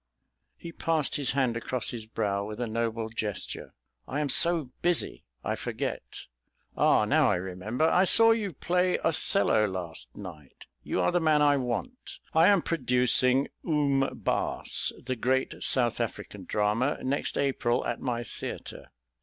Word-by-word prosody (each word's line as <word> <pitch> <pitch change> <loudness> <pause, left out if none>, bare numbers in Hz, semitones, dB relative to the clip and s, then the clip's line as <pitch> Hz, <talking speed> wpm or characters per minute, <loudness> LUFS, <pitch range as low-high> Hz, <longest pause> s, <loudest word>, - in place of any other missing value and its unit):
He 170 - -9
passed 160 -3 -1
his 140 -4 -2
hand 130 -4 +1
across 120 +1 -1
his 115 -3 -6
brow 100 -3 -2
with 105 +2 -7
a 120 - -1
noble 115 0 -2
gesture. 110 -3 -4 0.3
"I 145 - -3
am 150 -1 -1
so 165 -6 +4
busy 175 -1 0 0.2
I - - -1
forget. - - -5 0.5
Ah, - - +3
now - - +3
I - - +2
remember. 95 - -2
I 180 +3 +3
saw 225 +4 +7
you 215 -4 0
play 180 +4 0
Othello 155 - +2
last 90 -4 -7
night. 85 -9 -11 0.2
You - - -3
are 90 - +2
the 175 - +2
man 155 -2 +3
I 145 -1 +4
want. 140 - -5 0.2
I 160 +2 +5
am 200 -4 +4
producing 125 -2 +2
'Oom 140 -4 +1
Baas,' - - 0
the 130 +1 -4
great 130 +3 -1
South 120 -3 +2
African 105 -4 -6
drama, 105 +9 0
next 135 +2 -2
April, 130 -4 0
at 120 - -3
my 120 -2 -2
theatre. 115 - -7
130 Hz, 155 wpm, -27 LUFS, 110-155 Hz, 0.5 s, saw